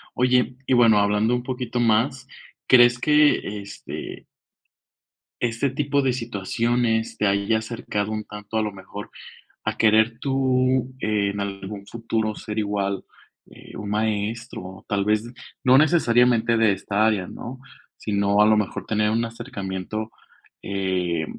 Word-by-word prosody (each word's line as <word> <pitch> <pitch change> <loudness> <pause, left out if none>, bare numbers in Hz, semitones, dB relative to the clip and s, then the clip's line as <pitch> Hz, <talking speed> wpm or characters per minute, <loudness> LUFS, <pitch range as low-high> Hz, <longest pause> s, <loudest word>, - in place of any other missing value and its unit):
Oye, 125 -1 +2
y - - 0
bueno, 115 -3 +6
hablando 105 +3 +2
un 125 - -1
poquito 125 -1 -3
más, 120 +4 +1 0.4
¿crees 120 -1 +6
que 150 -8 +3
este 100 - -8 1.2
este 120 +3 0
tipo 140 +1 0
de 130 -2 +2
situaciones 115 0 -1
te 105 - +1
haya 100 +3 +2
acercado 110 -2 -3
un 110 -1 -3
tanto 105 +1 -8
a 110 - +2
lo 105 - -3
mejor 100 +1 -9 0.6
a - - -2
querer 110 +2 +3
tú, 130 -1 +1
en 100 -2 0
algún 100 0 -6
futuro 115 -2 -2
ser 105 0 -5
igual, 100 -2 -1 0.5
eh, - - -14
un 105 - -6
maestro, 105 -2 -3
tal 100 -1 0
vez, 105 +1 +2 0.4
no 130 +1 +6
necesariamente 120 -7 +4
de 110 -3 +4
esta 100 +3 0
área, 105 -5 +1
¿no?, 130 +2 -8 0.4
si 105 - -3
no, 100 0 +3
a - - +7
lo 110 - +5
mejor, 105 -2 -2
tener 105 0 +1
un 115 +1 +1
acercamiento, 110 -2 -5 0.5
eh, 90 -4 -1
110 Hz, 140 wpm, -23 LUFS, 100-120 Hz, 1.2 s, a